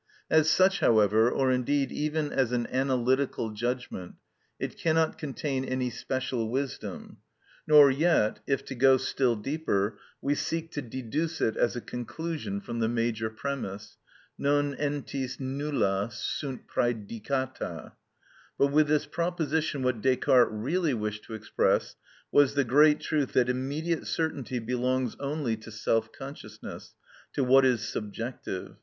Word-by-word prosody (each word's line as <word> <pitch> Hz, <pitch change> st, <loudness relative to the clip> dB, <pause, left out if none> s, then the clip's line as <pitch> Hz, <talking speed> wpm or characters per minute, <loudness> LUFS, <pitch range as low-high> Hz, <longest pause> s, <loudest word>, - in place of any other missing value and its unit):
As 160 Hz, 0 st, +5 dB
such, 190 Hz, +3 st, +4 dB
however, 110 Hz, +1 st, +4 dB
or 130 Hz, 0 st, +1 dB
indeed 135 Hz, +2 st, +1 dB
even 150 Hz, 0 st, -1 dB
as 130 Hz, -3 st, +1 dB
an 120 Hz, -1 st, 0 dB
analytical 130 Hz, -2 st, +1 dB
judgment, 120 Hz, -4 st, -4 dB, 0.4 s
it -, -, -4 dB
cannot 160 Hz, -1 st, +1 dB
contain 135 Hz, -2 st, -2 dB
any 130 Hz, -1 st, -1 dB
special 125 Hz, -3 st, -2 dB
wisdom; 135 Hz, +3 st, -4 dB, 0.5 s
nor 150 Hz, -2 st, +8 dB
yet 140 Hz, -6 st, +2 dB
if, 135 Hz, -1 st, 0 dB
to -, -, -6 dB
go 130 Hz, +1 st, +5 dB
still 130 Hz, -1 st, +1 dB
deeper, 105 Hz, -4 st, -1 dB, 0.2 s
we 140 Hz, -, 0 dB
seek 165 Hz, +2 st, -3 dB
to 145 Hz, -, -3 dB
deduce 130 Hz, +6 st, -3 dB
it 110 Hz, -, +1 dB
as 120 Hz, -, +1 dB
a 120 Hz, -, -3 dB
conclusion 165 Hz, -, -4 dB
from 120 Hz, -12 st, -5 dB
the 110 Hz, -, +2 dB
major 115 Hz, -1 st, 0 dB
premise, 110 Hz, -4 st, -5 dB, 0.4 s
non 145 Hz, 0 st, +2 dB
entis 140 Hz, -3 st, -3 dB
nulla 130 Hz, -7 st, -1 dB
sunt 130 Hz, +4 st, -4 dB
prædicata. 120 Hz, +3 st, -2 dB, 0.7 s
But 140 Hz, 0 st, +3 dB
with 150 Hz, +1 st, +4 dB
this 150 Hz, 0 st, +2 dB
proposition 160 Hz, -4 st, -1 dB
what 125 Hz, -3 st, 0 dB
Descartes 130 Hz, -1 st, +4 dB
really 145 Hz, +8 st, 0 dB
wished 105 Hz, -1 st, -4 dB
to 110 Hz, -, -7 dB
express 110 Hz, -, 0 dB, 0.4 s
was 145 Hz, -1 st, +4 dB
the 140 Hz, -, +3 dB
great 150 Hz, +4 st, +5 dB
truth 150 Hz, -4 st, -1 dB
that 125 Hz, -1 st, +3 dB
immediate 145 Hz, +6 st, -2 dB
certainty 140 Hz, -6 st, -2 dB
belongs 125 Hz, +1 st, -1 dB
only 140 Hz, -4 st, -1 dB
to 110 Hz, +1 st, -12 dB
self 110 Hz, +1 st, 0 dB
consciousness, 135 Hz, -6 st, -9 dB, 0.4 s
to 140 Hz, -, +1 dB
what 135 Hz, +1 st, +6 dB
is 120 Hz, -5 st, +2 dB
subjective. 105 Hz, -2 st, -5 dB
130 Hz, 135 wpm, -28 LUFS, 115-145 Hz, 0.7 s, nor